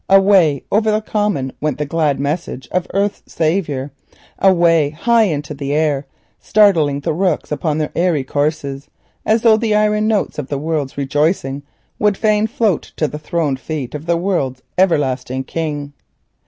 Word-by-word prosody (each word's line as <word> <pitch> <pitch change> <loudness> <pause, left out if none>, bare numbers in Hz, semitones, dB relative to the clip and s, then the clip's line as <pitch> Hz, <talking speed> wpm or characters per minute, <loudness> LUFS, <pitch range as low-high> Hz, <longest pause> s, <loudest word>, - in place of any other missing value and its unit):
Away 190 -7 +5
over 215 +1 +2
the 215 0 +2
common 205 -12 -1
went 150 -3 -1
the 150 - -2
glad 150 -2 0
message 140 -3 -3
of 180 -1 -1
Earth's 200 +1 -1
Saviour, 155 -5 -1 0.5
away 170 -5 +4
high 225 +9 +2
into 150 -4 -3
the 140 0 -4
air, 150 -3 0 0.3
startling 165 -10 +3
the 145 - -1
rooks 175 -2 -1
upon 150 0 -1
their 155 -1 -2
airy 170 -5 +1
courses, 145 0 -2 0.4
as 220 +1 +2
though 225 -2 +6
the 220 -1 0
iron 210 0 +2
notes 210 -7 0
of 140 - -4
the 140 - -3
World's 150 -2 -3
rejoicing 140 0 0 0.4
would 210 -2 +2
fain 215 0 +2
float 220 -5 -1
to 155 - 0
the 150 - -7
throned 150 -4 -1
feet 140 -3 -5
of 150 +2 -7
the 170 0 +2
World's 155 -9 -2
Everlasting 130 -7 +1
King. 145 -1 -4
155 Hz, 160 wpm, -18 LUFS, 145-195 Hz, 0.5 s, though